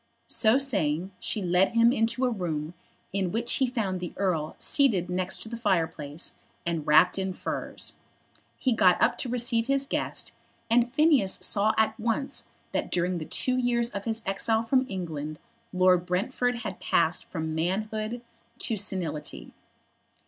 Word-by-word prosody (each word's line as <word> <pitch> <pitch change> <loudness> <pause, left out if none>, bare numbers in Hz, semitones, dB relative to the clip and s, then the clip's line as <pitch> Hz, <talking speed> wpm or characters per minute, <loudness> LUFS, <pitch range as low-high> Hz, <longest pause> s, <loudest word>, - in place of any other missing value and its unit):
So 230 +1 +4
saying 190 - 0
she 210 - -2
led 180 +4 +3
him 230 +1 +5
into 230 +1 +1
a 250 - +1
room, 165 -6 -3 0.4
in 190 -3 0
which 230 +3 0
he 265 - +2
found 210 -7 -2
the 175 -1 -6
Earl 170 -6 -1
seated 200 - +2
near 185 0 0 0.2
the 230 +1 -6
fireplace, 165 -8 -1 0.3
and 165 -3 -2
wrapped 180 +5 +5
in 190 -1 -2
furs. - - -5 0.6
He 260 - 0
got 190 -6 +4
up - - +3
to 255 - -2
receive 235 -1 +1
his 275 0 +2
guest, - - -2 0.4
and 240 +1 +4
Phineas 275 -9 +4
saw 210 +1 +3
at 220 +2 +1
once 235 +5 -1 0.3
that - - -2
during 180 0 0
the 155 - -5
two 255 +9 0
years 240 -1 +1
of 200 0 -5
his 225 -1 0
exile 220 +3 +1
from 255 +2 +2
England 155 -6 -5 0.3
Lord 185 -1 +3
Brentford 240 +6 -1
had 220 - -6
passed 170 0 +1
from 160 -2 -4
manhood 215 +7 -2 0.3
to 230 - +1
senility. 175 -7 -2
200 Hz, 155 wpm, -27 LUFS, 180-235 Hz, 0.6 s, him